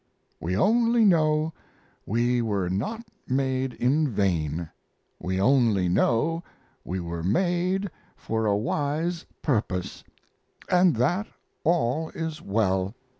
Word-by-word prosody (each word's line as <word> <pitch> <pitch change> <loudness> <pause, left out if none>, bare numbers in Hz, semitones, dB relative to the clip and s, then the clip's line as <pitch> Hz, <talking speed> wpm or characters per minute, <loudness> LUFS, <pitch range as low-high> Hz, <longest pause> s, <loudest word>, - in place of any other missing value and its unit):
We 90 +3 -2
only 230 - +4
know 155 -3 +3 0.5
we 120 +3 +1
were 100 -5 -1
not 180 - -2 0.2
made 130 -1 0
in 145 +5 +2
vain, 85 - -1 0.5
we 95 +1 -2
only 110 -5 +3
know 150 - +1 0.4
we 95 +3 -3
were 85 -1 -4
made 180 - 0 0.2
for 110 0 -2
a 100 -1 +3
wise 150 +9 -1 0.2
purpose, 105 - -1 0.6
and 180 -3 +4
that 175 - +1 0.4
all 160 -1 +1
is 160 -2 -4
well! 100 -1 0
125 Hz, 110 wpm, -26 LUFS, 100-165 Hz, 0.6 s, only